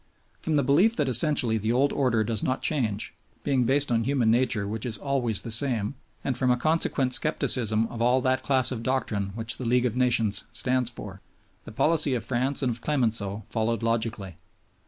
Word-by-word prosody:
From 160 - -2
the 145 - +2
belief 180 - +3
that 150 -3 -1
essentially 125 -3 +2
the 110 +2 -1
old 135 +4 +1
order 125 -5 +1
does 110 -1 -2
not 130 - -2
change, 110 -9 -1 0.3
being 130 -3 +1
based 140 +2 +1
on 115 -1 +1
human 125 -3 +1
nature 115 -4 0
which 110 +1 -4
is 115 -4 0
always 125 -6 -1
the 115 - -6
same, 115 -2 +2 0.3
and 135 - -2
from 130 +1 +1
a 125 - +3
consequent 140 -3 0
skepticism 115 -7 +2
of 115 0 -7
all 125 +2 +3
that 130 0 0
class 130 -3 +2
of 120 -3 -4
doctrine 115 -6 -2
which 115 0 -1
the 130 - -6
League 125 +1 +2
of 120 -2 -1
Nations 115 -6 +1
stands 125 0 0
for, 100 -5 -10 0.4
the - - -10
policy 150 +3 +2
of 115 - -4
France 130 +3 -1
and 125 - +1
of 115 0 -6
Clemenceau 110 -8 -1
followed 115 0 -1
logically. 110 -6 -2
120 Hz, 195 wpm, -25 LUFS, 110-135 Hz, 0.4 s, belief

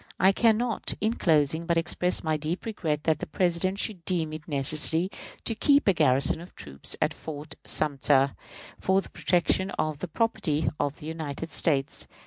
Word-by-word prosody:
I 190 - +6
can 220 +2 +3
not, 235 -1 -2
in 220 +2 +1
closing, 160 -4 +1
but 170 -1 +2
express 175 +2 0
my 160 -1 0
deep 155 +4 -4
regret 160 -9 -2
that 155 -2 +1
the - - -5
President 180 +3 0
should 200 -4 -2
deem 160 -3 -1
it 155 -1 -8
necessary 155 +5 +3 0.3
to 230 - +2
keep 285 +4 +3
a 195 - +6
garrison 140 -1 +2
of 175 - -13
troops 70 -1 -5
at - - +1
Fort 150 0 -8
Sumter 140 -2 +2 0.4
for 190 +1 +2
the - - -13
protection 185 +2 +1
of 155 -2 -1
the 185 - -4
"property" 160 -6 0
of 145 0 -1
the - - -11
United 160 0 -5
States. 140 -4 0
160 Hz, 175 wpm, -27 LUFS, 150-185 Hz, 0.4 s, I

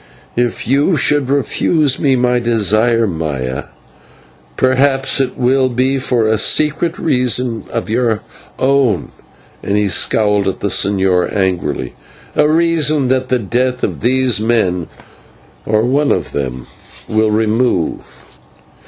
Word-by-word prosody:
"If 120 -1 -1
you 145 +7 +2
should 145 -1 +1
refuse 140 +1 +1
me 135 -2 +2
my 125 0 +1
desire, 115 0 +2
Maya, 75 -8 -4 0.9
perhaps 135 +1 +2
it 130 -2 -1
will 130 +1 +2
be 130 +2 0
for 125 -3 0
a 110 -1 +1
secret 155 +7 +1
reason 125 -5 0
of 115 - -4
your 115 -1 0 0.4
own" 130 - +1 0.5
and 100 +1 -1
he 105 -1 +1
scowled 105 +1 +1
at 95 - -2
the 100 - -1
señor 95 -2 +1
angrily 95 -3 -2 0.4
"a 150 0 +3
reason 155 -4 +1
that 130 0 0
the 130 - +2
death 125 +3 -2
of - - -2
these 125 -3 +1
men, 105 -7 0 0.8
or 110 0 +2
of - - 0
one 145 +2 +1
of - - -1
them, 65 -3 -4 0.4
will 110 0 +1
remove." 110 -3 -1
120 Hz, 130 wpm, -15 LUFS, 105-135 Hz, 0.9 s, a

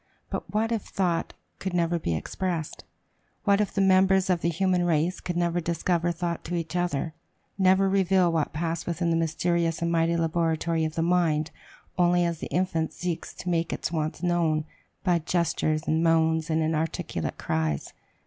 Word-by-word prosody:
But - - -4
what 220 +2 0
if 225 -2 0
thought 180 -4 -1 0.2
could 190 -2 -3
never 170 0 +1
be 85 - -1
expressed? 170 - -3 0.6
What 200 0 +3
if 210 - -1
the 195 - 0
members 190 0 +4
of 175 -2 +1
the 170 - +1
human 180 +1 +1
race 170 +1 +1
could 175 -1 -4
never 175 0 +1
discover 170 +1 0
thought 170 0 -3
to 175 - -3
each 170 0 -3
other, 170 -3 -1 0.4
never 190 0 +4
reveal 190 -2 +3
what 160 -3 0
passed 165 +2 -3
within 170 0 0
the - - +2
mysterious 165 0 0
and 170 0 0
mighty 165 0 +2
laboratory 165 0 0
of 155 - -4
the 165 - +1
mind 165 -3 +2 0.5
only 175 0 +4
as 170 -2 -2
the - - -5
infant 170 -3 0
seeks 175 -2 -4
to 180 - -5
make 170 -1 0
its - - -3
wants 155 0 -2
known, 165 -3 +1 0.4
by 175 -3 +3
gestures 155 -2 0
and 160 0 +1
moans 160 0 +2
and 160 0 +1
"inarticulate 160 +1 -2
cries?" 80 -3 -2
170 Hz, 175 wpm, -26 LUFS, 160-180 Hz, 0.6 s, members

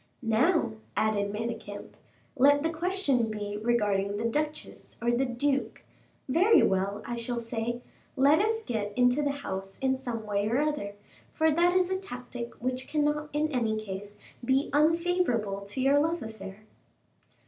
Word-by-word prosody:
"Now," 235 +4 +2 0.3
added 205 -2 +1
Manicamp, 220 -1 -5 0.5
"let 285 +2 +5
the 325 +1 0
question 320 - +1
be 205 -1 -4
regarding 205 -4 +1
the 225 - -2
Duchess 300 +6 -3
or 235 0 +1
the 255 +3 +1
Duke; 270 +3 -1 0.4
very 360 - +5
well, 195 +2 0
I 240 - -3
shall 235 +1 -3
say: 235 +1 -3 0.3
Let 285 +4 +5
us 445 +2 +1
get 210 - -3
into 250 +3 +4
the 290 - +1
house 195 -9 -5
in 265 -1 +1
some 240 -4 -5
way 205 0 0
or 235 - +1
other, 295 -9 -1 0.4
for 320 0 +2
that 345 +3 +3
is 370 0 +3
a 375 - 0
tactic 245 -8 -7
which 255 +1 -3
cannot 300 0 0
in 300 +1 0
any 225 -5 0
case 205 0 -7 0.3
be 265 +3 +1
unfavorable 305 - +2
to 205 +6 -6
your 275 +2 +4
love 325 0 0
affair." 210 -2 -9
245 Hz, 155 wpm, -28 LUFS, 215-295 Hz, 0.5 s, let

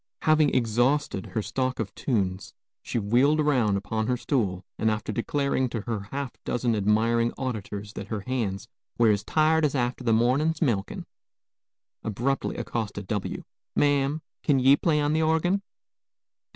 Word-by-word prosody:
Having 155 -2 +4
exhausted 120 -1 +1
her 110 - -3
stock 130 +2 -2
of 105 -4 -3
tunes, 95 -7 -2 0.3
she - - -4
wheeled 125 +8 +3
around 125 -9 +2
upon 110 +2 -2
her 125 - +1
stool, 100 -9 -1
and 110 - +2
after 110 0 -2
declaring 130 +2 0
to 115 -2 -3
her 105 -3 -4
half 135 -3 -5
dozen 120 -2 0
admiring 115 +3 +2
auditors 105 -5 -4
that 100 - -7
her 110 -1 -3
hands 110 -3 -3 0.3
were 115 -2 +5
"as 100 -1 0
tired 155 +7 +2
as 145 -2 +1
after 125 0 -1
the 115 - +2
mornin's 135 +8 +2
milkin'" 105 - -1 1.0
abruptly 120 +6 -1
accosted 105 -3 -4
W: 105 0 -3 0.3
"Ma'am, 145 +1 +2 0.2
kin 145 - +2
ye 135 +2 +6
play 155 0 +1
on 145 0 +1
the 160 - +2
orgin?" 160 +5 +2
120 Hz, 150 wpm, -26 LUFS, 105-140 Hz, 1.0 s, ye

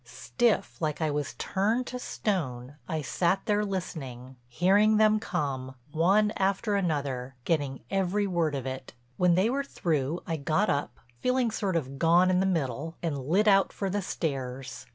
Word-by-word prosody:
Stiff, 230 -8 -1
like 150 -2 -1
I 155 -2 0
was 145 -2 -3
turned 220 +6 0
to 250 - -5
stone, 140 - -3 0.2
I 155 -2 -2
sat 180 +7 +1
there 210 -1 +2
listening, 135 -10 -5
hearing 200 - +4
them 215 0 +4
come, 130 -8 -3 0.2
one 195 +7 +3
after 195 +2 +1
another, 140 -8 -1
getting 145 -5 0
every 195 +1 +1
word 170 -6 0
of 135 -2 -4
it. 130 -1 -6 0.2
When 180 -1 +4
they 190 +4 +3
were 275 +4 0
through 160 - -1
I 165 - -2
got 155 +8 +1
up, 145 0 -2 0.2
feeling 250 - +1
sort 200 -4 -1
of 135 -4 -2
gone 175 +3 +5
in 180 - +3
the 190 - +2
middle, 160 -2 -2
and 165 -4 -1
lit 200 +7 +3
out 195 -1 +5
for 195 -2 -3
the 205 +1 0
stairs. 135 -6 -4
170 Hz, 170 wpm, -28 LUFS, 140-200 Hz, 0.2 s, gone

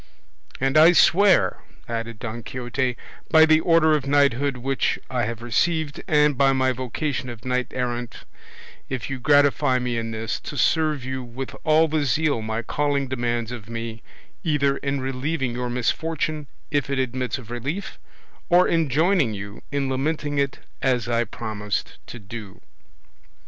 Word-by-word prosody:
And 135 +3 +2
I 165 +3 +8
swear," 190 +2 +4 0.3
added 115 -1 -4
Don 115 +1 -5
Quixote, 125 +1 -2 0.3
"by 160 0 +7
the 155 0 +5
order 165 -2 +4
of 140 -2 -2
knighthood 140 -1 +2
which 135 +2 0
I 125 -2 0
have 115 +1 -5
received, 155 +4 0
and 150 -1 +4
by 135 +1 +4
my 130 -1 +2
vocation 130 +2 -3
of 115 -1 -9
knight 125 -1 0
errant, 120 -1 -4 0.6
if 130 -1 -4
you 135 - -3
gratify 145 -1 +4
me 125 -2 -1
in 115 0 -4
this, 110 -1 -3
to 145 - -7
serve 155 -5 +2
you 130 0 -3
with 125 +2 -7
all 155 +1 +4
the 155 -1 0
zeal 145 -1 +1
my 110 +1 -3
calling 140 0 -1
demands 120 -2 -1
of 115 -3 -8
me, 115 -1 -5 0.4
either 140 -4 +1
in 140 -1 -2
relieving 135 0 -2
your 125 0 -3
misfortune 155 +4 -1 0.2
if 145 -2 0
it 140 - -1
admits 130 0 -1
of 120 -3 -11
relief, 140 - -4 0.5
or 180 +1 +5
in 165 -3 +1
joining 155 - +2
you 100 +2 -8
in 140 -1 0
lamenting 145 +2 -1
it 140 -1 -1 0.2
as 125 -3 +1
I 120 0 +1
promised 105 -2 -4
to - - -8
do." 105 -2 -9
130 Hz, 160 wpm, -23 LUFS, 120-150 Hz, 0.6 s, I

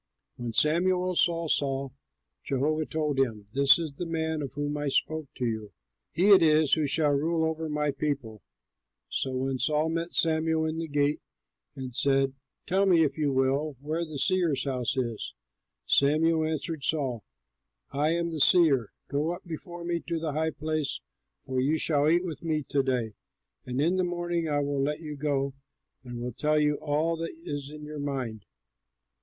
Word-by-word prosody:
When 120 -1 -4
Samuel 180 - +2
saw 170 -1 +2
Saul, 135 -3 0 0.5
Jehovah 150 +3 0
told 150 -3 -1
him, 110 -6 0
"This 140 0 +6
is 160 -4 -4
the 170 +5 -5
man 160 -1 -1
of 135 -3 -5
whom 145 0 -2
I 145 0 -2
spoke 155 +2 0
to 125 - -2
you! 110 -3 -3 0.4
He 195 +5 +3
it 195 - +9
is 155 -2 +4
who 155 -2 +3
shall 150 +1 +2
rule 160 +3 +1
over 160 0 -2
my 150 -1 0
people." 130 -9 -3 0.7
So 130 -1 -2
when 130 0 -1
Saul 150 +4 +1
met 165 +1 -2
Samuel 160 0 +2
in 160 +1 -2
the 165 - -3
gate, 145 0 +1 0.6
and 130 -2 -6
said, 135 0 +2 0.3
"Tell 195 +2 +2
me, 170 -3 +5
if 155 +1 -1
you 145 -2 +1
will, 135 +2 0
where 155 +4 -2
the 155 -3 -6
seer's 165 -3 +2
house 130 -2 -1
is," 120 -4 -3 0.5
Samuel 155 +3 +3
answered 160 -1 -3
Saul, 130 - -1 0.7
"I 145 +2 +1
am 170 0 -1
the 160 - -4
seer; 145 - +5
go 150 +4 -1
up 175 - -13
before 170 +1 -7
me 170 0 0
to 165 -1 -1
the 160 -2 -3
high 160 +2 0
place, 155 -1 -2 0.4
for 130 -1 -2
you 150 +5 +2
shall 150 -1 +3
eat 175 +3 +3
with 160 -5 -5
me 155 -2 -1
to 140 - +2
day; 125 -5 -1 0.5
and 125 +1 -2
in 170 +6 +2
the 185 - +2
morning 175 -2 -1
I 145 -1 +1
will 140 -1 -1
let 150 +3 -1
you 150 -2 -6
go 140 -2 -1 0.5
and 120 -2 -7
will 125 0 -4
tell 150 +5 +1
you 150 -1 +1
all 155 +3 0
that 165 0 -3
is 145 -1 -4
in 150 0 -10
your 150 0 -7
mind. 125 -9 -4
150 Hz, 180 wpm, -28 LUFS, 135-160 Hz, 0.7 s, it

